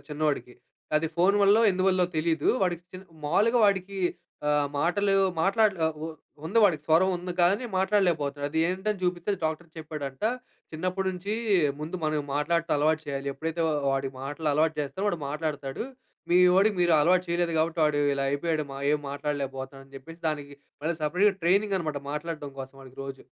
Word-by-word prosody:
చిన్నోడికి. 150 -4 -2 0.4
అది 160 +1 +1
ఫోన్ 185 +4 +4
వల్లో 205 +3 +6
ఎందువల్లో 185 -1 +2
తెలీదు 160 -1 +1
వాడికి 175 -2 0
చి 185 - -7 0.3
మావులుగా 210 +10 +3
వాడికి 195 0 0 0.5
ఆహ్, 145 -1 +2
మాటలు 195 +5 +2 0.3
మాట్లాడగా 195 -4 +3 0.2
ఉ - - -2 0.4
ఉంది 200 +8 +1
వాడికి 160 -7 +2
స్వరం 165 +4 +4
ఉంది, 180 0 -4
కాని 195 +7 +3
మాట్లాడలేకపోతున్నాడు. 165 -8 +1
అది 160 - -1
ఏంటని 190 +2 -2
చూపిస్తే 180 +2 -1
డాక్టర్ 160 +2 -2
చెప్పాడంట, 150 -1 -6 0.5
"చిన్నప్పటి 185 +4 -2
నుంచి 185 +3 -4 0.5
ముందు 160 +4 -4
మనం 155 -1 0
మాట్లాడటం 165 +3 +1
అలవాటు 155 +2 +2
చేయాలి. 140 0 -3
ఎప్పుడైతే 160 +3 -4
వా - - +1 0.2
వాడి 135 0 -1
మాటలు 145 +3 -3
అలవాటు 155 +2 +2
చేస్తారో 190 +8 -3
వాడు 175 -5 -2
మాట్లాడతాడు. 150 - -3 0.5
మీ 175 - +6 0.2
వోడికి 200 +2 +4
మీరు 175 -1 +4
అలవాటు 180 +4 +3
చేయలేదు 170 0 0
కాబట్టి 165 +1 0
వాడు 150 -1 +2
ఇలా 140 0 -1
అయిపోయాడు 155 +2 -1
మా 135 - -6
ఏం 150 - +1
మాట్లాడలేకపోతున్నాడని 135 -1 -5
చెప్పేసి" 165 +5 -12
దానికి 145 -2 -4 0.3
మళ్ళా 165 +3 0
సెపరేట్‌ 190 +6 +2
ట్రైనింగ్ 200 +3 +3
అనమాట 155 -4 -3
మాట్లాడటం 150 -2 -5
కోసం 135 +1 -9
వాడికి 130 +1 -15
రోజు. 135 -1 -8
160 Hz, 160 wpm, -27 LUFS, 145-185 Hz, 0.5 s, వల్లో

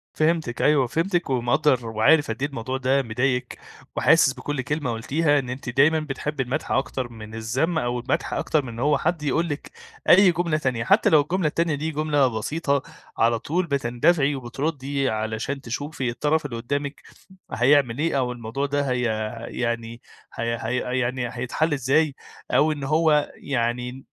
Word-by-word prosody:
فهمتِك 155 -6 0
أيوه، 145 -4 +4
فهمتِك 175 +4 -1
ومقدّر 125 0 +2
وعارف 115 +5 +3
قد 115 - -6
إيه 145 - 0
الموضوع 130 -1 -4
ده 135 +1 +2
مضايقِك، 125 +2 -1 0.4
وحاسس 155 -4 +4
بكل 145 0 -4
كلمة 145 -2 -2
قُلتيها 145 +6 +1
إن 125 -3 -5
أنتِ 125 0 -5
دايمًا 145 +6 +4
بتحبّي 150 -1 -3
المدح 135 +5 -3
أكتر 130 -2 -1
من 110 -1 -10
الذم، 130 +10 -1
أو 120 -4 -1
المدح 120 - -2
أكتر 155 -2 0
من - - -6
إن 115 - -8
هو 145 +2 +3
حد 165 0 -1
يقول 155 +4 +1
لِك 145 0 -5 0.4
أي 190 0 +8
جملة 170 -2 0
تانية، 130 -6 -1
حتى 115 - +4
لو 155 -2 +6
الجملة 170 +3 0
التانية 165 0 0
دي 155 +3 -3
جملة 150 -2 +2
بسيطة، 140 +3 -1 0.4
على 115 0 +3
طول 170 +9 -1
بتندفعي 140 +2 +2
وبتردّي 135 +1 -2
علشان 110 +5 -3
تشوفي 135 +1 -4
الطرف 150 +5 0
اللي 130 -5 -4
قدّامِك 140 +4 -3 0.5
هيعمل 125 -1 +3
إيه، 160 -2 +1
أو 125 -2 0
الموضوع 120 +3 -3
ده 145 0 -1
هي 125 -1 0 0.5
يعني 115 -1 -3 0.3
هي 115 0 -2
هي 125 +1 -1
يعني 120 0 -1
هيتحل 125 +6 -1
إزاي، 140 +2 +2 0.4
أو 155 +1 +4
إن 145 -2 -4
هو 150 +1 +2
يعني 125 0 -3
135 Hz, 165 wpm, -24 LUFS, 120-150 Hz, 0.5 s, أي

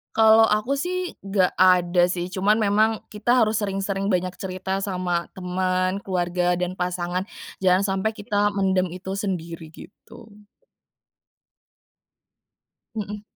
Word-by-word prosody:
Kalau 220 0 +6
aku 215 +6 +1
sih, 360 +5 -2
gak 195 -2 +1
ada 180 -1 +4
sih, 175 -1 -2
cuman 200 +3 +2
memang, 215 0 +3 0.2
kita 240 +4 +2
harus 215 0 -1
sering 195 -1 -2
sering 195 0 -2
banyak 185 -1 0
cerita 190 +1 -3
sama 180 -3 -2
teman, 185 +1 -1
keluarga, 180 -1 0
dan 180 0 -2
pasangan. 180 +1 -3 0.3
Jangan 185 +1 +3
sampai, 190 +2 0
kita 205 -1 0
mendem 190 -2 +1
itu 185 +2 -6
sendiri, 170 -5 -4
gitu. 220 +6 -15 2.6
Hmm. 210 -1 -5
190 Hz, 120 wpm, -23 LUFS, 180-205 Hz, 2.6 s, Kalau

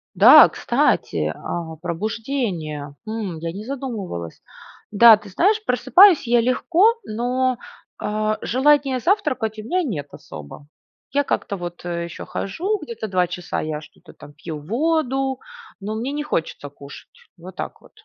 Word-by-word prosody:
Да, - - +9
кстати, 80 -1 0
а, 165 -2 -6
пробуждение. 175 - -3
Хм. 215 -6 -4
Я 165 0 -4
не 205 - -7
задумывалась. 220 - -6 0.5
Да, 225 +2 +8
ты 210 -1 -13
знаешь, 410 - +2
просыпаюсь 340 - +5
я 240 0 +4
легко, 345 - +3
но, 250 +3 -1 0.4
а, 215 0 -1
желания 270 0 +2
завтракать 255 - 0
у - - -7
меня 360 +10 0
нет 155 - -4
особо. 75 - -11 0.5
Я 285 +1 +2
как-то 200 - -2
вот, 175 -1 -8
э, 170 -1 -3
ещё 170 - -8
хожу, 380 - -2
где-то 230 -6 -6
2 185 -3 +1
часа 180 0 -4
я 155 -1 -4
что-то - - -17
там 145 0 -14
пью 155 -1 -7
воду, 270 - 0 0.4
но 215 +2 -4
мне 245 +5 -3
не 295 0 -3
хочется 165 - -3
кушать. 140 0 -13 0.3
Вот 180 +3 -12
так - - -6
вот. - - -20
220 Hz, 145 wpm, -21 LUFS, 170-270 Hz, 0.5 s, Да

